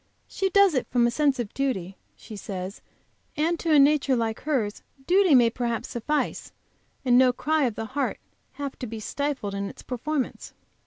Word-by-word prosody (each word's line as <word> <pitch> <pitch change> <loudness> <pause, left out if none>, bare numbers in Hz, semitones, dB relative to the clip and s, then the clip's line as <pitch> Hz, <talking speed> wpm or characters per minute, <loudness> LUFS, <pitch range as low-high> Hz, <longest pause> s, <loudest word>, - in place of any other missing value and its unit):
She 385 - -1
does 400 -2 +5
it 260 - 0
from 245 -1 +2
a 235 - +2
sense 280 +1 +2
of 235 -4 -4
duty, 195 -10 -2 0.2
she 215 - -11
says, 190 -1 -6 0.6
and 330 +2 +1
to 330 - -1
a 305 - +6
nature 280 -1 +4
like 225 -2 -1
hers 245 -9 -1 0.2
duty 365 -3 +5
may 235 -2 +5
perhaps 235 -1 -3
suffice, 295 +6 -2 0.5
and 245 -1 +5
no 255 -1 +6
cry 305 +3 +1
of 235 -4 -1
the 225 - -4
heart 270 +4 -2 0.4
have 280 -2 -6
to 250 - -4
be 225 0 -6
stifled 270 -3 -3
in 200 0 -3
its - - -12
performance. 260 +2 -3
255 Hz, 180 wpm, -26 LUFS, 225-300 Hz, 0.6 s, a